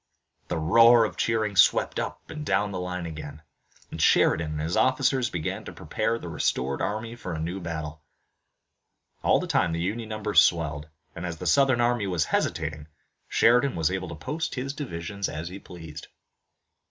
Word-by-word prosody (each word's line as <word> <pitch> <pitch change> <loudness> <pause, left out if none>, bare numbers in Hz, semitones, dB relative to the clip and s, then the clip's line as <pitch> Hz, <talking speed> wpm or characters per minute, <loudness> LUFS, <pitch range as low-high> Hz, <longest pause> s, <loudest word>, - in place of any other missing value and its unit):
The 90 - -2
roar 115 +8 +6
of - - -5
cheering 110 -3 0
swept 90 - +4
up - - -5
and 150 - -6
down 100 -4 +1
the 95 - -4
line 90 -1 -4
again, 75 -2 -8 0.5
and - - -5
Sheridan 75 -1 +3
and 75 - -4
his 80 +3 -2
officers 130 -1 +2
began 80 -3 -3
to - - -7
prepare 115 +1 -2
the 90 - -8
restored 70 -5 -1
army 110 +3 -3
for 90 -7 -6
a - - -4
new 85 +4 -3
battle. 80 -2 -5 1.2
All - - +3
the - - -3
time 85 - +1
the 85 - -2
Union 110 +6 -3
numbers 105 -1 +3
swelled, 75 -3 0 0.3
and, 85 - -6
as 85 -2 -4
the - - -7
Southern 135 -3 +4
army 120 -4 +1
was 90 -5 0
hesitating, 75 -1 -2 0.4
Sheridan 125 +2 +3
was 80 0 +1
able 95 -1 -3
to 85 - -6
post 150 - -4
his 135 +1 -3
divisions 100 - -4
as 80 +3 -5
he 95 +2 -8
pleased. 80 -5 -10
90 Hz, 175 wpm, -26 LUFS, 80-115 Hz, 1.2 s, roar